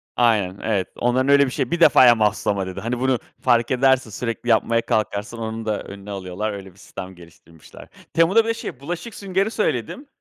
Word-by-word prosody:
Aynen, 105 -6 +2
evet, 100 -4 0
onların 130 +3 +1
öyle 140 0 +6
bir 130 - -4
şey, - - -2
“1 170 - 0
defaya 125 -7 +7
mahsus 105 -1 0
ama“ 100 -2 0
dedi. 95 - -6
Hani, 120 +2 -3
bunu 130 -2 +1 0.2
fark 120 -1 +2
edersin, 130 -2 +2
sürekli 115 +2 -4
yapmaya 115 +1 +3
kalkarsan 110 +1 -2
onun 110 0 -5
da 105 -1 -1
önünü 100 +1 -10
alıyorlar. 100 +2 -4
Öyle 95 -2 -9
bir - - -25
sistem 95 -1 -9
geliştirmişler. 85 -2 -16 0.3
Temu'da 185 +7 +4
böyle 230 - -1
şey 225 - -7
bulaşık 175 - -6
süngeri 195 +1 -1
söyledim. 210 - -2
115 Hz, 190 wpm, -22 LUFS, 100-135 Hz, 0.3 s, defaya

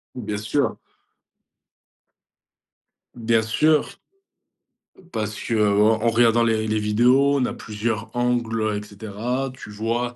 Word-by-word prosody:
Bien 105 -4 -4
sûr. 135 +7 -1 2.4
Bien 115 -1 +1
sûr 150 +7 +1 1.2
parce 110 -1 -3
qu'en 105 0 +3
regardant 115 0 +3
les 110 -1 +1
les 110 0 0
vidéos, 125 +7 +3
on 130 - +1
a - - -3
plusieurs 110 +1 -4
angles 115 -3 0
et - - -11
cetera. 110 +6 -4
Tu 115 - -11
vois? 115 +3 -2
115 Hz, 105 wpm, -23 LUFS, 105-120 Hz, 2.4 s, qu'en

